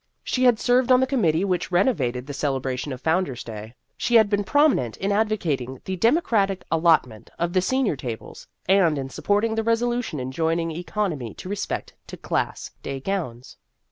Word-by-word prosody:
She 255 0 0
had 245 -3 +5
served 250 +1 +3
on 250 - +7
the 260 - +3
committee 195 - +1
which 180 -2 -1
renovated 140 - +1
the 145 - -6
celebration 135 -1 -2
of 130 - -5
Founder's 160 -5 0
Day. 110 +1 -8 0.2
She 240 - 0
had 220 -2 +6
been 205 0 +2
prominent 260 - +2
in 195 +1 -1
advocating 170 - -1
the 190 - -2
demo 235 - +3
cratic 195 - 0
allotment 160 -9 +2
of 170 +1 -1
the 185 - +3
senior 260 - +1
tables, 120 -4 -7 0.2
and 180 -5 +4
in 135 -1 -4
supporting 205 +9 0
the 225 0 -1
resolution 230 - 0
enjoining 165 +6 -1
economy 165 - -3
in 185 - -7
respect 205 0 -4
to - - -8
Class - - -3
Day 135 - -5
gowns. 135 -8 -4
180 Hz, 175 wpm, -24 LUFS, 135-220 Hz, 0.2 s, on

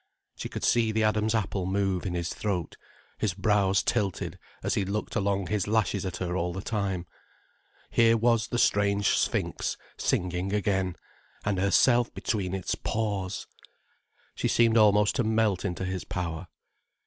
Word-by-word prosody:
She - - -6
could - - -6
see 115 -2 +3
the 110 0 +1
Adam's 110 +1 +2
apple 95 -4 -1
move 95 -1 0
in 90 - -3
his 85 0 -2
throat, 95 -6 -3 0.4
his 100 -5 0
brows 100 -1 +2
tilted 100 -6 -1 0.2
as - - 0
he 100 - +1
looked 100 +3 -3
along 100 -1 0
his 105 +1 -1
lashes 105 -3 +1
at 90 - -4
her 90 -1 -3
all 90 -1 -1
the 95 - -4
time. 100 -5 -2 0.9
Here 115 0 +5
was 115 -1 +2
the 120 - -2
strange 100 -2 +3
sphinx - - -1 0.2
singing 90 +2 -1
again, 95 -3 0 0.5
and 100 -2 0
herself 120 +5 +4
between 95 -4 -2
its 95 - -2
paws! 100 -4 -2 0.9
She - - -1
seemed 115 -1 +3
almost 105 -2 +5
to 125 - +2
melt 110 -4 +1
into 95 -1 -3
his 95 -1 -3
power. 90 -1 -4
100 Hz, 155 wpm, -28 LUFS, 95-110 Hz, 0.9 s, Here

